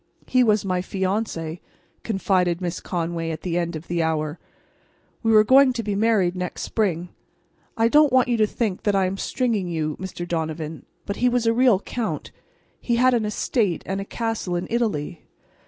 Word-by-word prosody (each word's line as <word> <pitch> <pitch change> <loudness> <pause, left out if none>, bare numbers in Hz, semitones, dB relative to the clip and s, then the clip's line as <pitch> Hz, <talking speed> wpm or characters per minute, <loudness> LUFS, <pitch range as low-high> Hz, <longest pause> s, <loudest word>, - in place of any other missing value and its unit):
"He 255 -1 +3
was 215 -3 +2
my 185 -1 0
fiance," 185 -3 -2 0.4
confided 185 -5 +1
Miss 180 -1 -3
Conway, 165 -2 -3
at 160 -1 -5
the 175 -2 -3
end 170 -1 -2
of 155 +2 -8
an 175 - 0
hour. 155 -1 -1 0.8
"We 225 - +2
were 215 -1 +7
going 260 +3 +6
to 235 -1 -3
be 205 -1 -2
married 200 -4 +2
next 180 -1 -4
spring. 180 -5 -1 0.7
I 225 0 +4
don't 295 +3 +5
want 255 0 +4
you 245 - +1
to 215 -1 +3
think 210 -4 -2
that 205 -1 +1
I 195 -1 +3
am 185 +1 -2
stringing 225 -5 -1
you, 155 -3 -2
Mr. 180 -2 -6
Donovan, 160 -2 -4 0.2
but 200 - -4
he 250 - +3
was 245 -1 0
a 230 - +3
real 245 -4 +4
Count. 230 -1 -4 0.5
He 240 - 0
had 255 +2 +4
an 230 -3 +1
estate 210 -3 0
and 195 +1 -2
a - - -3
castle 225 -5 -3
in 175 - -2
Italy. 185 -9 -1
195 Hz, 190 wpm, -23 LUFS, 170-230 Hz, 0.8 s, were